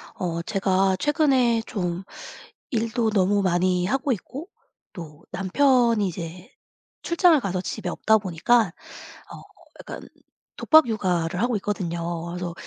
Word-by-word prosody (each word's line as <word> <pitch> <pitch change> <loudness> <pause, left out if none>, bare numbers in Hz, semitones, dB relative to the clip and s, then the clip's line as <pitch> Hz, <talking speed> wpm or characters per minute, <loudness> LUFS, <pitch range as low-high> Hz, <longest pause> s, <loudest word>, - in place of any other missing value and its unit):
어 170 -2 -3
제가 190 -1 +1
최근에 265 -6 +2
좀 180 -4 -3 0.7
일도 230 -1 0
너무 200 0 +2
많이 180 0 +1
하고 270 +5 0
있고, 275 - -8 0.5
또 165 -4 -10
남편이 230 +3 +2
이제 175 +1 -8 0.5
출장을 340 -2 +4
가서 185 -3 -2
집에 180 - -5
없다 220 +4 +2
보니까 200 +3 +1 0.6
어 - - -10 0.4
약간 - - -8 0.6
독박 315 -3 +5
육아를 180 -5 -1
하고 240 0 +1
있거든요. 170 -4 -3
그래서 175 0 -5
195 Hz, 245 characters per minute, -24 LUFS, 175-235 Hz, 0.7 s, 독박